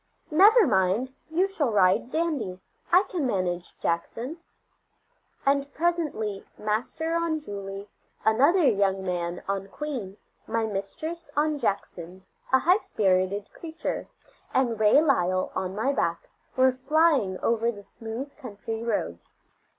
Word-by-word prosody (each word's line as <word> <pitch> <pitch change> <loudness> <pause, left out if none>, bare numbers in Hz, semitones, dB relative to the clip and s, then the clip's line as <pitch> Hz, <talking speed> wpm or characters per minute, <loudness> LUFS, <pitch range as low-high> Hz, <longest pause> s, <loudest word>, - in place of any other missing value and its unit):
"Never 415 +8 +7
mind, 205 - +1 0.2
you 350 +5 +2
shall 320 -9 -1
ride 195 +3 +3
Dandy. 275 - -1 0.3
I 360 +3 +7
can 350 -8 -2
manage 180 -5 -2
Jackson." 230 - -2 1.1
And 280 0 +2
presently 300 - -1
Master 245 +10 -2
on 335 -2 0
Julie, 200 -6 -7 0.4
another 285 - +4
young 195 -4 +2
man 175 -1 -3
on 195 0 -2
Queen, 235 -7 -5 0.3
my 225 0 0
mistress 220 - -5
on 300 0 +1
Jackson, 185 -4 -3 0.3
a 265 - +7
high 355 +8 +4
spirited 195 - 0
creature, 325 -1 -5 0.5
and 240 -4 +2
Ray 220 +8 +6
Lyle 185 - +1
on 185 0 -3
my 265 +7 +1
back, 170 -10 -2 0.3
were 260 0 +5
flying 265 - +2
over 230 0 +2
the 205 -3 -11
smooth 230 +7 -7
country 225 -1 -6
roads. 205 - -3
230 Hz, 125 wpm, -26 LUFS, 195-300 Hz, 1.1 s, Never